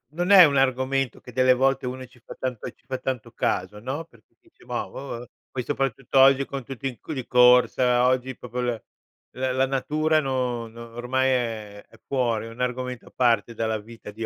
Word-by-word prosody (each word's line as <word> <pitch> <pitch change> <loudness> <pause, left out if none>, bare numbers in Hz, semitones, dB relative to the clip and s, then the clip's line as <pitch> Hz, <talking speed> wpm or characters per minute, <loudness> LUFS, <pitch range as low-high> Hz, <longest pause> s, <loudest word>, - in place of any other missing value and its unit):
non 175 +3 0
è 195 -2 +11
un 145 -4 +4
argomento 130 -1 0
che 125 - -12
delle 130 +1 +4
volte 135 0 +1
uno 130 +1 -5
ci 125 0 -22
fa 115 - -11
tanto 125 -4 -4
ci - - -35
fa 130 - -3
tanto 125 -3 -4
caso, 100 -2 -2
no, 130 +8 -4
perché 115 -9 -25
dice. - - -24
"Mah, - - -3
boh", 125 -3 -7 0.2
poi 125 - -4
soprattutto 135 0 -1
oggi 135 +1 +6
con 135 -2 -6
tutti 135 +1 -5
in 130 +5 -8
di 130 -4 -5
corsa, 125 0 +5
oggi 130 0 0
proprio 125 0 -7
la 120 -2 -2 0.5
la 130 0 -1
la 130 +1 +2
natura 155 +4 +1
no 125 -4 -2
no 115 +1 -11
ormai 130 +2 0
è 110 -5 -2
è 115 - -19
fuori, 120 -5 -1
è - - -8
un 115 - -13
argomento 125 0 -3
a - - -17
parte 115 -3 +2
dalla 110 -1 -1
vita 110 0 -11
di 115 +2 -6
125 Hz, 200 wpm, -25 LUFS, 115-135 Hz, 0.5 s, è